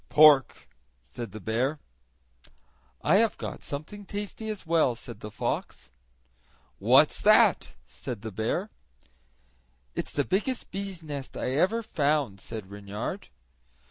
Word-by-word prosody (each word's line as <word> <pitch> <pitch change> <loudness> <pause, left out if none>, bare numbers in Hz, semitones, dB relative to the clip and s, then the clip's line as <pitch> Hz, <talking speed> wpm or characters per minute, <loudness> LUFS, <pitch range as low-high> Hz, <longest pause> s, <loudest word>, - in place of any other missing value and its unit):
"Pork," 150 -3 +6 0.4
said 95 +11 -7
the 110 - -7
bear. 120 - 0 1.3
"I 170 +6 +5
have 225 +1 +2
got - - -6
something 155 +9 -6
tasty 205 +2 -5
as 210 -4 -5
well," 160 -7 +3
said 120 0 -10
the 105 - -7
fox. - - -4 0.9
"What's - - +5
that?" - - +5
said 100 - -7
the 110 - -5
bear. 115 - -2 1.2
"It's - - -4
the 145 - 0
biggest 215 +7 -1
bees' 195 -3 -5
nest 145 -3 -6
I 125 - -1
ever 190 - +2
found," 145 - 0
said 105 -3 -7
Reynard. 100 0 -5
145 Hz, 125 wpm, -28 LUFS, -, 1.3 s, Pork